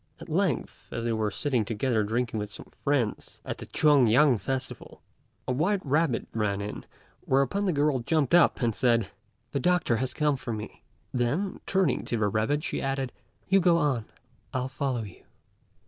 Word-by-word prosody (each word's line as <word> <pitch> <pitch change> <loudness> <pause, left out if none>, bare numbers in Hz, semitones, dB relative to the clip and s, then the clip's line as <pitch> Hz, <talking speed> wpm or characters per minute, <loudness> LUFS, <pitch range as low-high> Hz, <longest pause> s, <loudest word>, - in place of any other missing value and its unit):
At - - -10
length, - - -1
as 115 - -3
they 115 - +1
were 110 -1 0
sitting 125 +2 0
together 115 +2 0
drinking 115 +1 -1
with 105 0 -5
some - - -9
friends 135 -7 -1
at - - -5
the - - -8
Tuan 145 -5 +4
yang 125 +1 +5
festival, 130 +6 -5 0.4
a - - 0
white 180 +9 0
rabbit 145 -3 +1
ran 105 -3 0
in, 100 +1 -6 0.4
whereupon 140 +10 +2
the 190 - +2
girl 145 -3 +2
jumped 145 +3 0
up 175 -6 +5
and 115 -1 +2
said, 115 -3 +2 0.4
"The 140 - -1
doctor 175 -6 +2
has 130 +2 -3
come 150 -2 +2
for 120 -2 -5
me;" 105 -1 -7 0.3
then, 140 +11 -1
turning 190 -1 +1
to 120 - -1
the 105 -2 +1
rabbit, 110 +9 0
she - - -2
added, 135 -2 -2 0.4
"You 195 +1 +5
go 175 -2 +4
on: 140 -8 +1 0.5
I'll 130 0 -1
follow 130 -3 -2
you." 100 -4 -11
130 Hz, 180 wpm, -27 LUFS, 115-150 Hz, 0.5 s, yang